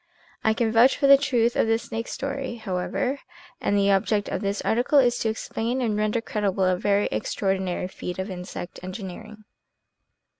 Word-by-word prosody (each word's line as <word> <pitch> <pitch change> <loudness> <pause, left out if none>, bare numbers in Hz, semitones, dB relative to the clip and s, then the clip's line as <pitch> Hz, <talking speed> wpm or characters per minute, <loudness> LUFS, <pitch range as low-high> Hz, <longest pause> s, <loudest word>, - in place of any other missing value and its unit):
I 220 0 +3
can 225 -1 +1
vouch 235 +4 +5
for - - +1
the 275 0 +9
truth 245 -4 +1
of - - +2
the 225 0 +3
snake 230 0 -5
story, 275 -2 -4
however, 220 +6 -2 0.4
and 205 - +1
the 200 0 +3
object 200 +1 +1
of 190 - -3
this 200 0 -1
article 245 +6 +2
is 245 -3 +4
to 225 - 0
explain 225 +3 -2
and 230 -4 0
render 215 +2 0
credible 200 -4 -1
a 185 0 +3
very 200 +2 +1
extraordinary 190 -2 -1
feat 180 -1 -6
of 190 +2 -4
insect 180 0 -7
engineering. 200 +3 -8
215 Hz, 175 wpm, -25 LUFS, 195-240 Hz, 0.4 s, the